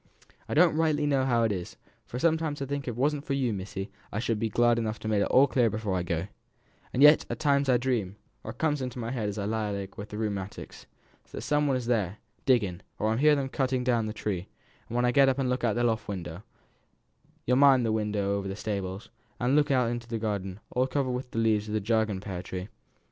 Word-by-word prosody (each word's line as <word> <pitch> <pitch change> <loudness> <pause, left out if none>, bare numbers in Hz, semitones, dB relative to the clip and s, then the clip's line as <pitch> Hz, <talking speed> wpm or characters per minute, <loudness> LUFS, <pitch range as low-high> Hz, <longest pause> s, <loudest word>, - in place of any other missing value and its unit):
"I - - -2
don't 165 0 +5
rightly 155 -2 +2
know 135 -2 +2
how 120 -3 +2
it 110 - +2
is, 90 -3 -5 0.3
for 125 - -6
I - - -3
sometimes 160 -1 +1
think 140 0 -3
if - - -18
it 120 - -3
wasn't 140 +3 0
for 140 - -2
you, 130 -4 0
missy, 95 0 -5 0.2
I - - -4
should 115 -1 -1
be 115 - 0
glad 120 +2 +3
to - - +1
have 110 0 -4
made 105 -2 +1
it - - +3
all 130 +2 +6
clear 125 -4 +2
before 105 -2 -3
I 90 - 0
go; 85 0 -2 0.7
and 135 - +2
yet 150 +1 +8
at - - -3
times 140 -2 +2
I 125 - +5
dream, 120 -7 -1 0.3
or - - -7
it 110 - -8
comes 150 -3 0
into 125 -1 -4
my 115 -1 -3
head 110 -5 -2
as 105 - -5
I 100 - -2
lie 110 0 -1
awake 100 -1 -5
with 105 +1 -7
the 105 - -6
rheumatics, 100 -3 -5 0.4
that - - -6
some 150 0 +1
one 135 -2 +2
is 125 - -4
there, 105 -5 0 0.3
digging; 100 -9 +2 0.2
or 110 +1 0
that 110 - 0
I - - -1
hear 150 0 +5
'em 135 -1 -2
cutting 130 -2 0
down 120 -3 +1
the - - -3
tree; 100 -4 -3 0.4
and 120 - -3
then 125 - +2
I 125 - +3
get 135 +1 +5
up 130 - 0
and 135 -2 0
look 125 -1 -1
out 115 -3 +2
of - - -6
the 120 - +1
loft 115 -2 0
window 90 -3 -5 1.0
you'll 125 +1 +3
mind 135 -3 +6
the 110 - +1
window 105 -2 0
over 100 -1 -3
the 95 - -4
stables, 100 -1 -4 0.3
as 125 +1 +1
looks 145 +1 +3
into 120 -3 0
the 115 -1 -3
garden, 100 -3 -3
all 130 +1 +1
covered 135 -1 -1
over 125 - -1
wi' 130 - -8
the 115 - -8
leaves 110 -2 +2
of 105 - -3
the - - +2
jargonelle 110 -2 0
pear 95 -3 -5
tree? 95 +2 -6
115 Hz, 255 wpm, -28 LUFS, 105-130 Hz, 1.0 s, yet